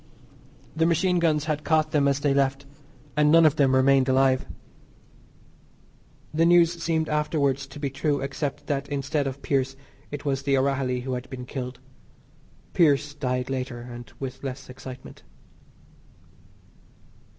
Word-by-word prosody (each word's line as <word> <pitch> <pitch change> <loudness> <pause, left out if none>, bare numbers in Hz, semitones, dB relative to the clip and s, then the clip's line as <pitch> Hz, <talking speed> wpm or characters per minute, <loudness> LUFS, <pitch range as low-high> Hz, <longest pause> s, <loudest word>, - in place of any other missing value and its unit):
The 160 +1 +2
machine 175 +2 +2
guns 155 -3 +1
had 150 -1 -2
caught 155 -1 +2
them 145 -2 +3
as 140 0 +1
they 145 -2 +2
left, 135 0 +1 0.5
and 150 0 +4
none 165 0 +7
of 155 0 +4
them 135 -2 +4
remained 135 0 +4
alive. 130 0 +3 1.9
The 160 +2 +2
news 170 0 +4
seemed 160 -1 0
afterwards 140 -3 0
to 145 - -11
be 140 -2 -2
true 140 +1 0
except 140 +1 -4
that 140 -1 -2
instead 140 0 -1
of 135 +1 -6
Pearse 135 -1 0 0.3
it 145 0 -7
was 135 -1 0
The 140 -1 +1
O'Rahilly 130 -2 0
who 130 +1 -4
had 125 0 -5
been 125 -2 -7
killed. 125 -1 -6 0.9
Pearse 145 -3 +3
died 125 -2 -2
later 130 -2 -3
and 120 0 -10
with 130 -1 -6
less 135 -1 -6
excitement. 130 0 -10
140 Hz, 145 wpm, -25 LUFS, 130-150 Hz, 1.9 s, none